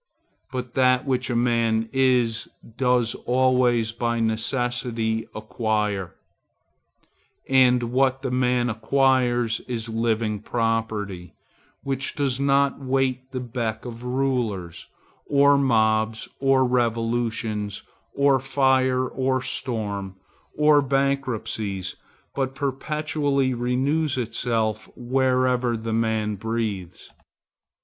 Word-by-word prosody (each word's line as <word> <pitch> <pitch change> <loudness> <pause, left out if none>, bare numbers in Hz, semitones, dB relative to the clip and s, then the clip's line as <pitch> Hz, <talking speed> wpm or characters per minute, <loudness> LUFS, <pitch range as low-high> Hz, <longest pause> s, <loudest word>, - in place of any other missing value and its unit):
But 125 -2 -5
that 130 0 +3
which 130 -1 -1
a 120 - -1
man 115 -2 +1
is, 125 -4 +2 0.3
does 125 -2 +2
always 125 -3 +3
by 115 0 -1
necessity 115 0 -1
acquire, 105 -4 -2 1.3
and 125 -2 +4
what 130 +2 +1
the 130 - -2
man 125 -1 +1
acquires 120 0 +1
is 115 -2 -4
living 110 -1 0
property, 110 -6 -2 0.5
which 135 0 -2
does 135 -3 -1
not 140 0 +2
wait 130 -1 -1
the 130 - -3
beck 115 -2 -4
of 120 -1 -8
rulers, 125 -9 -2 0.4
or 140 0 +5
mobs, 110 -4 +2
or 135 -1 +3
revolutions, 115 -3 -1 0.3
or 140 -1 +4
fire, 130 -1 +2
or 130 +1 0
storm, 100 -7 -3 0.4
or 150 -1 +5
bankruptcies, 130 -8 -2 0.4
but 135 -1 -2
perpetually 140 -1 -1
renews 130 +5 0
itself 110 -2 -1
wherever 125 -1 +1
the 110 0 -4
man 110 -2 0
breathes. 110 -5 -4
125 Hz, 95 wpm, -24 LUFS, 110-130 Hz, 1.3 s, or